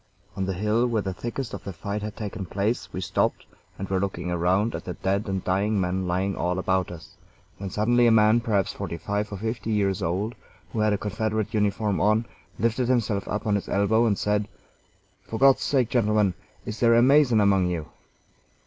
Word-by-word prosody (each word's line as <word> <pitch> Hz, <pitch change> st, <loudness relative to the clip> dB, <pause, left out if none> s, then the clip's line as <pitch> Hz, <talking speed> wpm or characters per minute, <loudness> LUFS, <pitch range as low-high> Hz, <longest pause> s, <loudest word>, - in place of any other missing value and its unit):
On 95 Hz, -1 st, -2 dB
the 95 Hz, -, -1 dB
hill 105 Hz, +5 st, +1 dB
where 115 Hz, -3 st, 0 dB
the 95 Hz, -, -3 dB
thickest 120 Hz, +5 st, -5 dB
of -, -, -6 dB
the 100 Hz, -, -5 dB
fight 100 Hz, +5 st, -4 dB
had 105 Hz, 0 st, -5 dB
taken 100 Hz, -3 st, -5 dB
place 100 Hz, +6 st, -2 dB
we 95 Hz, -, -4 dB
stopped, 90 Hz, -, 0 dB, 0.3 s
and 95 Hz, -, -5 dB
were 95 Hz, 0 st, 0 dB
looking 90 Hz, -2 st, -3 dB
around 90 Hz, +6 st, +1 dB
at -, -, -6 dB
the 90 Hz, -, -5 dB
dead 100 Hz, +3 st, -1 dB
and 95 Hz, -1 st, -2 dB
dying 100 Hz, +3 st, +1 dB
men 95 Hz, 0 st, -1 dB
lying 95 Hz, +2 st, 0 dB
all 90 Hz, +1 st, -1 dB
about 95 Hz, 0 st, 0 dB
us, 85 Hz, -2 st, -11 dB, 0.4 s
when 100 Hz, -1 st, -4 dB
suddenly 120 Hz, +5 st, +3 dB
a -, -, +5 dB
man, 110 Hz, +1 st, +5 dB
perhaps 110 Hz, -5 st, 0 dB
forty 90 Hz, -4 st, -5 dB
five 105 Hz, +4 st, -3 dB
or 100 Hz, -, -4 dB
fifty 110 Hz, +1 st, -4 dB
years 100 Hz, -3 st, +1 dB
old, 95 Hz, +7 st, -1 dB, 0.4 s
who 115 Hz, -, -2 dB
had 110 Hz, 0 st, +3 dB
a 105 Hz, -, +1 dB
Confederate 110 Hz, 0 st, -2 dB
uniform 105 Hz, -3 st, 0 dB
on, 110 Hz, +3 st, +3 dB, 0.3 s
lifted 115 Hz, +2 st, 0 dB
himself 110 Hz, -5 st, 0 dB
up 105 Hz, -, -3 dB
on 105 Hz, -, +1 dB
his 100 Hz, -, -2 dB
elbow, 110 Hz, +4 st, +3 dB
and 100 Hz, -3 st, +1 dB
said: 105 Hz, 0 st, 0 dB, 0.8 s
"For 110 Hz, -, -4 dB
God's 135 Hz, +2 st, +5 dB
sake, 130 Hz, -5 st, +1 dB
gentlemen, 105 Hz, -5 st, +2 dB, 0.3 s
is 110 Hz, -1 st, -5 dB
there 115 Hz, -1 st, +5 dB
a 120 Hz, -, +5 dB
Mason 135 Hz, -4 st, +5 dB
among 100 Hz, -3 st, +3 dB
you?" 85 Hz, -3 st, -2 dB
105 Hz, 205 wpm, -25 LUFS, 95-110 Hz, 0.8 s, a